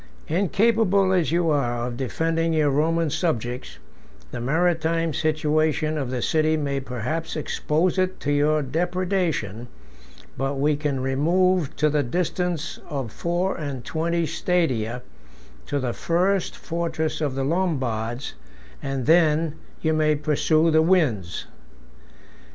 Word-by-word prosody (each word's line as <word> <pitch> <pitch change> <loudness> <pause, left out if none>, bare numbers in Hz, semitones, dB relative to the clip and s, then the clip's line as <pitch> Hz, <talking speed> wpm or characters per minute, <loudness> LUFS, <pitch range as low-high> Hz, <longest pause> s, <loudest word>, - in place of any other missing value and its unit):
Incapable 200 +2 +3
as 175 -4 +2
you 170 -1 +2
are 120 -5 0
of 120 -1 -4
defending 165 +6 0
your 150 -2 +3
Roman 160 +2 +1
subjects, 125 -8 -2 0.5
the 125 - -5
maritime 165 +3 +1
situation 155 0 +1
of 140 -5 -2
the 125 -2 -2
city 155 0 +2
may 140 -2 -1
perhaps 130 +5 -4
expose 160 +3 0
it 185 0 0
to 145 - -1
your 150 +1 +2
depredation 170 - -1 0.7
but 135 +1 -1
we 145 +2 +2
can 145 -3 -2
remove 170 +5 +1
to 150 - +2
the 150 0 +2
distance 170 +3 -2
of 135 -7 -3
four 175 +6 -1
and 140 -7 -5
twenty 170 +1 0
stadia, 125 -10 0 0.6
to 145 - -1
the 125 -3 -2
first 180 +2 0
fortress 160 -2 -2
of 145 -4 -1
the 135 - -1
Lombards, 130 -8 -1 0.5
and 135 -2 -3
then—you 160 0 +2
may 155 -1 +3
pursue 155 +2 +2
the 160 0 +5
winds. 140 - +1
155 Hz, 125 wpm, -24 LUFS, 135-170 Hz, 0.7 s, the